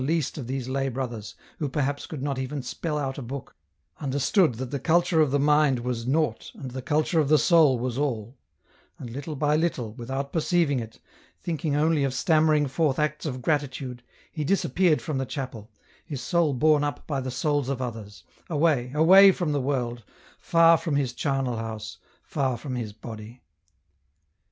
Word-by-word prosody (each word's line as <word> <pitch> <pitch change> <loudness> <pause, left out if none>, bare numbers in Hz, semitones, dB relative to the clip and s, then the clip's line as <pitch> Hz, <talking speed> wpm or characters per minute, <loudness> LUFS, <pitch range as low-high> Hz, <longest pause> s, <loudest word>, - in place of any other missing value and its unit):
173 155 +6 +1
least 155 -2 -3
of 125 - -6
these 130 -1 -3
lay 135 +1 -1
brothers 120 -4 -5 0.2
who 150 - -1
perhaps 145 0 -2
could 145 -4 -6
not 140 -2 -2
even 135 +1 -4
spell 150 +5 -3
out 135 -2 -3
a - - -5
book, 135 +2 -7 0.5
understood 145 - +2
that 130 +2 -5
the 140 - -2
culture 170 +2 +3
of 150 - +3
the 140 - +2
mind 150 -3 +3
was 120 -1 -3
naught 140 -4 0
and 130 -2 -7
the 130 +1 -5
culture 155 +5 +1
of 145 -3 +1
the 155 - +6
soul 155 -6 +5
was 125 +1 -3
all, 120 -4 -2 0.6
and 120 - -8
little 145 +5 -5
by 150 +1 +1
little, 150 -9 -1
without 135 +3 -5
perceiving 165 -4 +2
it, 115 -1 -8 0.4
thinking 160 -3 -2
only 155 0 +2
of 135 -1 -1
stammering 155 0 +3
forth 140 0 0
acts 150 +1 -1
of 130 -3 -5
gratitude, 135 -5 -2 0.3
he 155 - -3
disappeared 175 -1 +2
from 150 -4 -2
the - - 0
chapel, 125 -7 -6 0.3
his 145 -5 -6
soul 160 +4 +1
borne 150 +2 +3
up 145 0 -3
by 140 -3 -2
the 130 - -4
souls 145 +1 0
of 135 -2 -2
others, 110 -7 -6 0.3
away, 150 -6 +1
away 190 +6 +8
from 175 -4 -2
the 145 -1 0
world, 120 -3 -2 0.4
far 165 0 +5
from 160 -5 -2
his 135 -4 0
charnel 135 -3 -1
house, 110 -1 -6 0.2
far 135 -4 -1
from 130 +3 -6
his 115 -4 -4
body. 110 +2 -10
140 Hz, 185 wpm, -26 LUFS, 125-155 Hz, 0.6 s, away